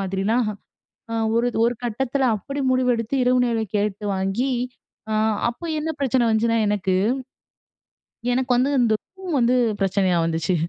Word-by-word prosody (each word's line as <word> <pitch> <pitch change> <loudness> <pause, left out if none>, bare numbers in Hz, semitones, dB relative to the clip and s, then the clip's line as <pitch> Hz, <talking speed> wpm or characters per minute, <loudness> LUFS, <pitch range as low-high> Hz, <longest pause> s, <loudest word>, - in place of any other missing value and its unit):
மாதிரிலாம்" 195 +5 0 0.9
ஒரு, 235 +1 +2 0.2
ஒரு 235 +1 +3
கட்டத்தில 260 +3 -1
அப்படி 275 +7 -6
முடிவெடுத்து. 250 -1 +1
இரவு 250 0 +3
நேரம் 225 -4 -1
கேட்டு 205 0 -2
வாங்கி 195 +8 -1 0.6
ஆ - - 0 0.4
அப்ப 330 +8 -6
என்ன 320 +1 -3
பிரச்சன 260 -3 +2
வந்துச்சுன்னா 230 +1 +2
எனக்கு, 195 -2 0 1.4
எனக்கு 255 +1 -1
வந்து 260 +3 +2
இந்த 230 -3 +3 0.2
ரூம் 365 -5 -4
வந்து 245 0 +3 0.3
பிரச்சனையா 190 -2 +2
வந்துச்சு. 165 +2 0
235 Hz, 130 wpm, -23 LUFS, 200-255 Hz, 1.4 s, ஒரு